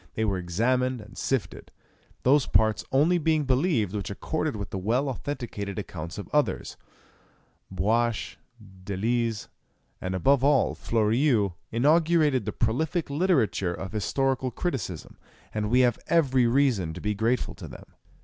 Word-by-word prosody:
They 110 Hz, -, 0 dB
were 100 Hz, -3 st, 0 dB
examined 125 Hz, +8 st, 0 dB
and 105 Hz, 0 st, -13 dB
sifted, 135 Hz, -4 st, -3 dB, 0.5 s
those 135 Hz, +2 st, +4 dB
parts 110 Hz, -1 st, +2 dB
only 160 Hz, +6 st, +3 dB
being 155 Hz, -1 st, +2 dB
believed 130 Hz, -, +1 dB
which 105 Hz, -2 st, -3 dB
accorded 155 Hz, +8 st, -2 dB
with 100 Hz, -1 st, -6 dB
the 95 Hz, -, -3 dB
well 120 Hz, +9 st, 0 dB
authenticated 120 Hz, -7 st, -5 dB
accounts 85 Hz, -5 st, -6 dB
of 100 Hz, -, -6 dB
others. 150 Hz, -1 st, 0 dB, 1.0 s
Buache, 110 Hz, +4 st, 0 dB, 0.5 s
Delisle, 115 Hz, +4 st, -1 dB, 0.6 s
and 95 Hz, 0 st, -3 dB
above 135 Hz, +8 st, +3 dB
all 140 Hz, -2 st, +3 dB
Fleurieu, 115 Hz, -1 st, +1 dB, 0.2 s
inaugurated 150 Hz, 0 st, +3 dB
the 105 Hz, -, -2 dB
prolific 145 Hz, -, -1 dB
literature 140 Hz, -, +1 dB
of 95 Hz, -, -6 dB
historical 130 Hz, +5 st, 0 dB
criticism, 125 Hz, -, -4 dB, 0.4 s
and 105 Hz, -1 st, -1 dB
we 125 Hz, +2 st, +4 dB
have 120 Hz, -3 st, +2 dB
every 135 Hz, -7 st, +3 dB
reason 115 Hz, -, +1 dB
to -, -, -6 dB
be 105 Hz, 0 st, -1 dB
grateful 115 Hz, +4 st, 0 dB
to 85 Hz, -, -10 dB
them. -, -, -11 dB
120 Hz, 140 wpm, -26 LUFS, 105-140 Hz, 1.0 s, those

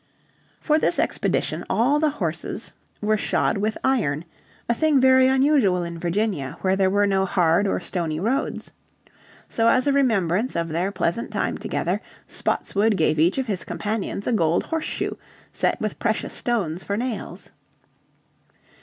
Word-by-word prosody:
For 305 Hz, 0 st, +2 dB
this -, -, +1 dB
expedition -, -, 0 dB
all 275 Hz, +6 st, +2 dB
the 310 Hz, 0 st, +3 dB
horses 175 Hz, -, -4 dB, 0.3 s
were 215 Hz, +1 st, +2 dB
shod 205 Hz, -, 0 dB
with 215 Hz, +2 st, -1 dB
iron, 170 Hz, -, +1 dB, 0.4 s
a 235 Hz, -, +3 dB
thing 300 Hz, +2 st, +3 dB
very 260 Hz, 0 st, +6 dB
unusual 265 Hz, -9 st, +3 dB
in 170 Hz, -1 st, -6 dB
Virginia 175 Hz, -5 st, -1 dB
where 190 Hz, 0 st, +2 dB
there 190 Hz, -1 st, +2 dB
were 205 Hz, +1 st, +3 dB
no 195 Hz, -1 st, +2 dB
hard 180 Hz, +1 st, +2 dB
or -, -, 0 dB
stony 165 Hz, -4 st, -3 dB
roads. 230 Hz, +9 st, -2 dB, 0.8 s
So 225 Hz, 0 st, +1 dB
as 255 Hz, +2 st, +4 dB
a 285 Hz, -, +2 dB
remembrance 225 Hz, -5 st, +1 dB
of 170 Hz, 0 st, -1 dB
their 175 Hz, +5 st, -1 dB
pleasant 185 Hz, +3 st, -1 dB
time -, -, -1 dB
together -, -, -2 dB, 0.3 s
Spotswood 205 Hz, +1 st, 0 dB
gave 155 Hz, -1 st, +2 dB
each 170 Hz, +8 st, +3 dB
of 265 Hz, -, 0 dB
his 200 Hz, -6 st, -3 dB
companions 210 Hz, -2 st, -3 dB
a -, -, 0 dB
gold 170 Hz, -5 st, +2 dB
horseshoe 320 Hz, -1 st, -3 dB, 0.4 s
set -, -, 0 dB
with 215 Hz, -4 st, -3 dB
precious 220 Hz, -2 st, -1 dB
stones 190 Hz, -8 st, -1 dB
for 200 Hz, -, -2 dB
nails. 245 Hz, -1 st, -5 dB
205 Hz, 155 wpm, -23 LUFS, 175-250 Hz, 0.8 s, very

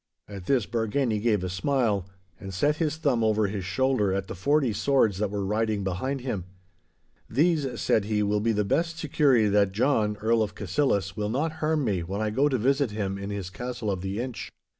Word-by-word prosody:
At 100 Hz, -3 st, -9 dB
this 130 Hz, -6 st, +2 dB
Bargany 110 Hz, +2 st, 0 dB
gave 105 Hz, -4 st, +1 dB
a -, -, -1 dB
smile, 100 Hz, -1 st, 0 dB, 0.3 s
and 95 Hz, -2 st, -7 dB
set 145 Hz, +11 st, +1 dB
his 155 Hz, -2 st, -1 dB
thumb 140 Hz, -8 st, +1 dB
over 110 Hz, -1 st, +2 dB
his 100 Hz, -1 st, -3 dB
shoulder 105 Hz, +2 st, +1 dB
at 95 Hz, 0 st, -1 dB
the -, -, -7 dB
forty 135 Hz, -, +1 dB
swords 110 Hz, -3 st, +2 dB
that 105 Hz, -1 st, 0 dB
were 100 Hz, -1 st, -3 dB
riding 105 Hz, 0 st, 0 dB
behind 110 Hz, +9 st, -2 dB
him. 105 Hz, -9 st, -3 dB, 0.8 s
'These,' 150 Hz, 0 st, +1 dB
said 105 Hz, -, +2 dB
he, 105 Hz, 0 st, 0 dB
'will 105 Hz, +1 st, +1 dB
be 115 Hz, +2 st, +1 dB
the 105 Hz, -1 st, 0 dB
best 165 Hz, +10 st, 0 dB
security 140 Hz, -7 st, +3 dB
that 100 Hz, -1 st, +2 dB
John, 110 Hz, -2 st, +1 dB
Earl 110 Hz, +2 st, +2 dB
of 105 Hz, -, -2 dB
Cassillis, 100 Hz, -, 0 dB
will 105 Hz, -1 st, -2 dB
not 145 Hz, +8 st, 0 dB
harm 155 Hz, -2 st, +1 dB
me 95 Hz, -6 st, 0 dB
when 95 Hz, +4 st, -4 dB
I 110 Hz, -1 st, -1 dB
go 135 Hz, +6 st, +2 dB
to 130 Hz, -, +1 dB
visit 135 Hz, +3 st, +2 dB
him 100 Hz, -2 st, -3 dB
in 100 Hz, +1 st, -5 dB
his 100 Hz, -3 st, -5 dB
castle 120 Hz, -2 st, -4 dB
of 95 Hz, -2 st, -3 dB
the 95 Hz, +3 st, -3 dB
Inch. 125 Hz, 0 st, -5 dB
110 Hz, 205 wpm, -26 LUFS, 100-135 Hz, 0.8 s, security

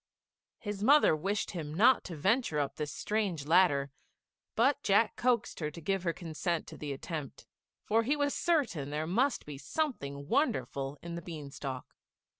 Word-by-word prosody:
His 205 Hz, -2 st, -5 dB
mother 285 Hz, -, +6 dB
wished 195 Hz, +7 st, -2 dB
him 155 Hz, -4 st, -5 dB
not 235 Hz, +7 st, +5 dB
to 175 Hz, -, -6 dB
venture 195 Hz, -, +1 dB
up 140 Hz, -2 st, -1 dB
this 150 Hz, -1 st, -3 dB
strange 200 Hz, -9 st, -2 dB
ladder, 150 Hz, -5 st, +4 dB, 0.6 s
but 265 Hz, +5 st, +3 dB
Jack 205 Hz, +2 st, +3 dB
coaxed 245 Hz, -1 st, +1 dB
her 150 Hz, -2 st, -1 dB
to 155 Hz, -, -10 dB
give 195 Hz, +4 st, -1 dB
her 170 Hz, -1 st, 0 dB
consent 170 Hz, 0 st, -3 dB
to -, -, -9 dB
the 150 Hz, -1 st, -5 dB
attempt, 145 Hz, 0 st, -6 dB, 0.4 s
for 225 Hz, +2 st, +2 dB
he 265 Hz, +6 st, +1 dB
was 285 Hz, -1 st, 0 dB
certain 240 Hz, -, 0 dB
there 150 Hz, +2 st, -2 dB
must 245 Hz, -, +1 dB
be 145 Hz, -2 st, -8 dB
something 140 Hz, -, -3 dB
wonderful 180 Hz, -, 0 dB
in 170 Hz, 0 st, -6 dB
the 170 Hz, -, -4 dB
bean 155 Hz, -4 st, -7 dB
stalk. 130 Hz, -2 st, -5 dB
170 Hz, 170 wpm, -31 LUFS, 150-225 Hz, 0.6 s, mother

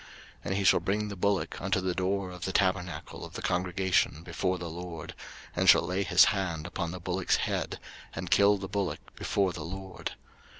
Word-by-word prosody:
03:004:004 -, -, -16 dB, 0.4 s
And 90 Hz, -, -1 dB
he 100 Hz, -, 0 dB
shall -, -, +6 dB
bring 105 Hz, +2 st, -1 dB
the 100 Hz, -, -5 dB
bullock 100 Hz, +1 st, 0 dB
unto 95 Hz, 0 st, +1 dB
the 90 Hz, -1 st, -1 dB
door 95 Hz, +1 st, -1 dB
of 90 Hz, -1 st, -6 dB
the 95 Hz, -, -1 dB
tabernacle 90 Hz, -5 st, -1 dB
of -, -, -9 dB
the -, -, -6 dB
congregation 90 Hz, -3 st, +1 dB
before 95 Hz, +1 st, -1 dB
the 85 Hz, -1 st, -5 dB
LORD; 85 Hz, 0 st, -7 dB, 0.4 s
and -, -, +4 dB
shall -, -, +8 dB
lay 95 Hz, +2 st, -1 dB
his 95 Hz, -, +6 dB
hand 85 Hz, -6 st, -2 dB
upon 85 Hz, -1 st, -3 dB
the 90 Hz, +2 st, -6 dB
bullock's 90 Hz, +1 st, +1 dB
head, -, -, -2 dB, 0.4 s
and 90 Hz, -, -5 dB
kill 100 Hz, 0 st, +6 dB
the 95 Hz, -1 st, -5 dB
bullock 100 Hz, -2 st, -3 dB
before 95 Hz, -3 st, 0 dB
the 85 Hz, -, -6 dB
LORD. 95 Hz, +3 st, -6 dB
95 Hz, 200 wpm, -29 LUFS, 90-95 Hz, 0.4 s, shall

